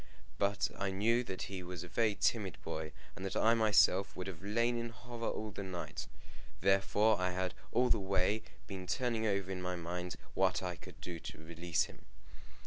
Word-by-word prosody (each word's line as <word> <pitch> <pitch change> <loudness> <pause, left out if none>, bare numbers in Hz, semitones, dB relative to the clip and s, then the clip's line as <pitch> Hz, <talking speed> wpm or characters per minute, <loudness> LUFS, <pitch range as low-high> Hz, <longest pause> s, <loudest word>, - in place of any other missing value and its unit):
But 100 0 +2
I 100 - +1
knew 115 +6 +3
that 95 -3 -4
he 95 -1 -4
was 90 -1 -5
a - - -7
very 110 +2 +2
timid 100 -7 +1
boy, 80 0 -3 0.2
and 95 - -7
that 95 - -2
I 115 - +5
myself 100 -3 +4
would 90 - -4
have 95 -3 -6
lain 115 +4 +2
in 115 0 -2
horror 115 0 -4
all 110 0 -3
the 100 - -5
night. 95 -3 -4 0.5
Therefore 100 +2 +4
I 90 0 +2
had 90 0 -1 0.2
all 125 0 +4
the 110 - +5
way 95 +2 +2 0.2
been 95 -2 -6
turning 115 +4 +1
over 100 -2 0
in 90 -1 -3
my 90 0 -1
mind 90 +1 -3 0.2
what - - +2
I 90 -1 -2
could - - -12
do 85 -2 -5
to - - -7
release 85 +1 0
him. - - -11
95 Hz, 195 wpm, -35 LUFS, 90-110 Hz, 0.5 s, I